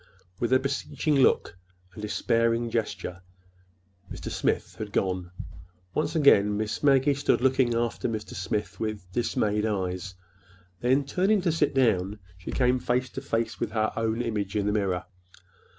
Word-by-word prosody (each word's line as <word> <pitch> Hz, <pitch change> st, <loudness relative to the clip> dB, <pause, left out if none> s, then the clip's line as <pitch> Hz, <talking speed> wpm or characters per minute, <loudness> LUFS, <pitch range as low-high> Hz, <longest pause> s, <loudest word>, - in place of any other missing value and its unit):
With 120 Hz, -, -1 dB
a 130 Hz, -, +7 dB
beseeching 140 Hz, +3 st, -1 dB
look 130 Hz, -, +3 dB, 0.4 s
and 105 Hz, -, -9 dB
a -, -, -2 dB
despairing 115 Hz, +1 st, +1 dB
gesture 105 Hz, -4 st, -3 dB, 0.9 s
Mr. -, -, -6 dB
Smith -, -, -1 dB
had 105 Hz, -1 st, -5 dB
gone. 90 Hz, -3 st, -1 dB, 0.6 s
Once 155 Hz, +1 st, -1 dB
again 105 Hz, -9 st, +5 dB
Miss 105 Hz, 0 st, -2 dB
Maggie 140 Hz, 0 st, +4 dB
stood 140 Hz, -, +1 dB
looking 130 Hz, -2 st, +2 dB
after 115 Hz, 0 st, -1 dB
Mr. 110 Hz, -2 st, -5 dB
Smith 100 Hz, +4 st, -3 dB
with 110 Hz, -3 st, -3 dB
dismayed 105 Hz, -1 st, 0 dB
eyes. 95 Hz, -2 st, -3 dB, 0.6 s
Then, 130 Hz, +3 st, +2 dB
turning 190 Hz, +9 st, +2 dB
to 175 Hz, -2 st, +1 dB
sit 150 Hz, -3 st, +1 dB
down, 105 Hz, -6 st, +2 dB, 0.2 s
she 90 Hz, 0 st, -10 dB
came 125 Hz, 0 st, +2 dB
face 125 Hz, +1 st, 0 dB
to 135 Hz, -, -6 dB
face 115 Hz, -4 st, -2 dB
with 110 Hz, -, -3 dB
her 110 Hz, -1 st, +1 dB
own 115 Hz, +1 st, 0 dB
image 105 Hz, -4 st, -2 dB
in 105 Hz, -1 st, +1 dB
the 105 Hz, -, +1 dB
mirror. 95 Hz, -4 st, 0 dB
115 Hz, 155 wpm, -27 LUFS, 105-130 Hz, 0.9 s, a